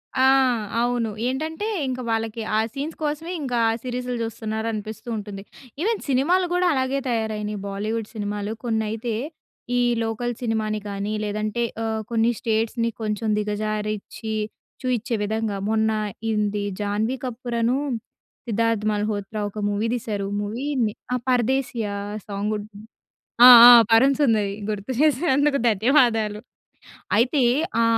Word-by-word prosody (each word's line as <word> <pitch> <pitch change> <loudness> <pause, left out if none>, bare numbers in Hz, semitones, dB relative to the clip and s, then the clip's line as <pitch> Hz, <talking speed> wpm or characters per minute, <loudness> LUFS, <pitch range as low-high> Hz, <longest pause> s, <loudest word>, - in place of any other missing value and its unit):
ఆ! 260 - +4 0.6
అవును. 240 -2 0 0.2
ఏంటంటే 315 +10 -3 0.2
ఇంక 255 0 -3
వాళ్ళకి 225 0 -2 0.2
ఆ - - +3
సీన్స్ 295 +4 -4
కోసమే 305 +4 -2
ఇంకా 250 -4 -1 0.2
సిరీస్‌లు 250 0 -3
చూస్తున్నారు 220 0 -4
అనిపిస్తూ 220 +3 -6
ఉంటుంది. 200 -1 -7 0.4
ఈవెన్ 440 +3 +1
సినిమాలు 340 +8 +3
కూడా 360 0 +2
అలాగే 265 +1 0
తయారైనాయి. 215 -2 -2
బాలీవుడ్ 215 +2 -3
సినిమాలు 205 0 -3
కొన్నైతే 220 0 -2 0.6
ఈ - - +3 0.2
లోకల్ 235 +2 -2
సినిమాని 215 -2 -1
కానీ 200 +1 -3
లేదంటే 215 +3 -2 0.2
ఆహ్. 220 0 -1
కొన్ని 230 +1 +3
స్టేట్స్‌ని 225 +1 0
కొంచెం 215 +1 -2
దిగజారించి 215 +1 -3 0.5
చూపించే 245 -2 -1
విధంగా 220 -1 -2
మొన్న 220 0 +2 0.4
ఇంది 210 -1 0 0.2
జాన్వీ 210 +5 0
కపూర‌ను, 240 0 -1 0.7
సిద్ధార్థ్ 230 -1 +1
మల్హోత్రా 210 0 -2
ఒక 210 - -8
మూవీ 205 +3 -1
తీశారు, 210 -4 -3
మూవీ 225 +7 -4 0.5
ఆ - - +2
'పరదేశీయ' 250 -3 0 0.4
సాంగ్ 205 +1 -2
ఉంటుంది. 210 0 -10 0.6
ఆ! - - +12 0.2
ఆ! - - +12 0.2
'పరం 255 +5 +6
సుందరి' 215 -7 +2 0.2
గుర్తు 210 +4 -3
చేసినందుకు 285 -1 +3
ధన్యవాదాలు. 225 -2 +3 0.8
అయితే 260 +5 +3 0.4
ఆ - - +4
225 Hz, 120 wpm, -23 LUFS, 210-250 Hz, 0.8 s, ఆ